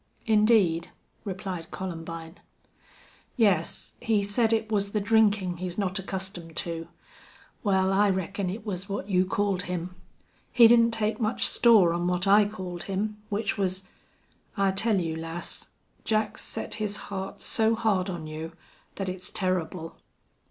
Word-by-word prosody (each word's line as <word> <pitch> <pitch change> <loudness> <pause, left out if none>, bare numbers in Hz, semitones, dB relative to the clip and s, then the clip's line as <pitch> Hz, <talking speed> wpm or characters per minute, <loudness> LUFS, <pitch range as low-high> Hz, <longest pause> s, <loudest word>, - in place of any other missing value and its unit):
"Indeed," 210 -7 +3 0.3
replied 190 -4 -5
Columbine. 165 -2 -6 1.0
"Yes. 200 - +1
He 215 -3 +2
said 220 +3 +2
it 220 -1 0
was 200 -1 0
the 210 - +2
drinkin' 205 -4 +2
he's 180 0 -5
not 195 -1 0
accustomed 190 -3 -6
to. 165 -1 -3 0.8
Wal, 190 -2 +2
I 205 +1 +4
reckon 190 0 -1
it 210 +4 -6
was 195 -1 -4
what 195 -1 -3
you 185 -1 +3
called 200 -1 0
him. 180 0 -3 0.6
He 235 -2 +8
didn't 230 0 +6
take 225 0 -1
much 220 +1 +1
store 210 -8 +5
on 175 +1 -1
what 180 +1 +1
I 205 +1 +6
called 185 -4 -6
him, 210 +2 -3
which 205 0 -1
was 190 -1 0
wuss.... - - -25 0.7
I 195 -1 +3
tell 205 +1 +2
you, 165 -2 -2
lass, 165 +1 -4 0.4
Jack's 215 -1 0
set - - -4
his 205 -1 -1
heart 190 0 -5
so 225 0 +3
hard 205 -4 +1
on 170 -4 -5
you 155 +2 -6 0.4
thet 195 - -3
it's 185 0 -4
turrible." 180 -3 -2
195 Hz, 150 wpm, -27 LUFS, 180-210 Hz, 1.0 s, He